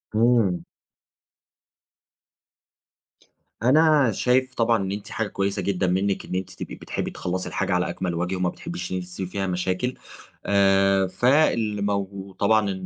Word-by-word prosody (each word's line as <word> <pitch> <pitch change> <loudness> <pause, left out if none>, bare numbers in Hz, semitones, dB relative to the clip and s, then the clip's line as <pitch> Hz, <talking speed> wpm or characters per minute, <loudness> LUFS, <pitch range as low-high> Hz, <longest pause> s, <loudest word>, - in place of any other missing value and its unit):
إمم. 115 - +3 3.0
أنا 150 0 +5
شايف 130 +4 +1
طبعًا 115 -1 +2
إن 95 - -3
أنتِ 100 0 -6
حاجة 110 - -2
كويّسة 100 0 -2
جدًا 95 -1 0
منِّك 95 +2 0
إن - - -5
أنتِ 95 0 -3
تبقي - - -7
بتحبي - - -4
تخلّصي 90 +1 -3
الحاجة - - -1
على - - +1
أكمل 90 -2 -3
وجه، 90 +2 -1
وما 90 -1 0
بتحبيش 175 - -6
إن - - -1
أنتِ 90 - -5
تسيبي 90 +1 -6
فيها 95 0 -2
مشاكل. 90 +7 -1 0.5
آآ، 95 -1 +3
فالمو 105 -4 +1
وطبعًا 100 +2 +1
100 Hz, 135 wpm, -24 LUFS, 95-115 Hz, 3.0 s, أنا